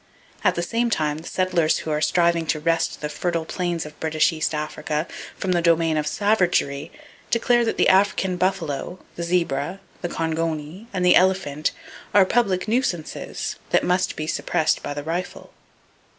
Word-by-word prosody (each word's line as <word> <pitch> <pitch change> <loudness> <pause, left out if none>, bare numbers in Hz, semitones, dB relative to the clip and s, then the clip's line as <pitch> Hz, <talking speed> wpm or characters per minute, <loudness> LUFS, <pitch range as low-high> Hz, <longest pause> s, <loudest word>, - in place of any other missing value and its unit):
At - - +3
the 170 - -1
same 235 +6 0
time, 150 -7 0
the 165 - -10
settlers 180 -4 +1
who 160 - -4
are 150 0 0
striving 170 -1 +2
to 155 - 0
wrest 165 +1 0
the 150 - -1
fertile 165 +2 -2
plains 175 -2 -2
of 150 - -11
B.E.A, 155 -1 0 0.3
from 190 - -1
the 175 -1 +2
domain 165 -1 +3
of 150 -1 0
savagery 180 -9 +1 0.4
declare 240 +1 +3
that 225 - -1
the - - +4
African 190 -1 +3
buffalo, 180 -3 -1 0.2
the - - -5
zebra, 170 -1 0 0.2
the 175 - -2
kongoni 165 +4 -3
and 185 -2 -1
the 180 - +7
elephant 180 -6 +2 0.5
are 200 -2 +7
public 195 -4 +1
nuisances 215 -9 -2
that - - +3
must 180 +1 +1
be 155 - -3
suppressed 155 0 0
by 145 - -5
the 145 - -4
rifle. 175 +4 -5
170 Hz, 160 wpm, -23 LUFS, 155-185 Hz, 0.5 s, the